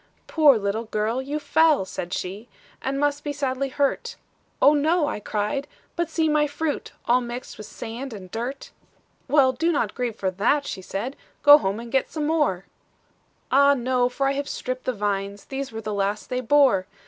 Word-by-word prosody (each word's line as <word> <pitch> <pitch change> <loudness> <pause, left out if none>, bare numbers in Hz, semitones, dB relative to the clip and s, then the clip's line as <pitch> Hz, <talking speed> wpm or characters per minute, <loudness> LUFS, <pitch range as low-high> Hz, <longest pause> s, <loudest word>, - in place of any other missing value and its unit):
"'Poor 300 -6 +5
little 210 +2 -2
girl, 220 +3 -1
you 285 +3 -3
fell,' 305 -4 +3
said 175 -1 -6
she, 200 +7 -5 0.3
'And 275 +1 -2
must 290 0 0
be 290 - -2
sadly 275 -1 -2
hurt;' 280 0 -1 0.4
'Oh, 290 - +6
no,' 310 +3 +2
I 290 -7 -3
cried; 210 +7 -2 0.3
'but 340 -2 -1
see 320 -1 +1
my 300 -1 +3
fruit, 295 +1 -3
All 245 +1 +3
mixed 240 +1 -6
with 215 - -8
sand 245 +4 -7
and 190 -4 -9
dirt.' 245 +5 -5 0.6
"'Well, 270 -1 +5
do 325 +7 0
not 305 - 0
grieve 245 -4 -3
for 190 -3 -1
that,' 235 +10 +1
she 190 - -5
said; 205 +9 -4 0.3
'Go 290 +1 +10
home, 195 -1 -2
and 235 0 -9
get 270 0 +1
some 305 -2 -3
more,' 295 - +1 0.9
'Ah, 280 +1 +6
no, 250 -1 +1
for 270 +2 -1
I - - +2
have 280 +1 -3
stripped 255 0 -4
the 255 - 0
vines, 200 -1 -3
These 270 -1 -5
were 225 0 -6
the 215 -1 -4
last 200 +1 -2
they 250 0 0
bore. 255 -7 +4
260 Hz, 190 wpm, -24 LUFS, 215-290 Hz, 0.9 s, Go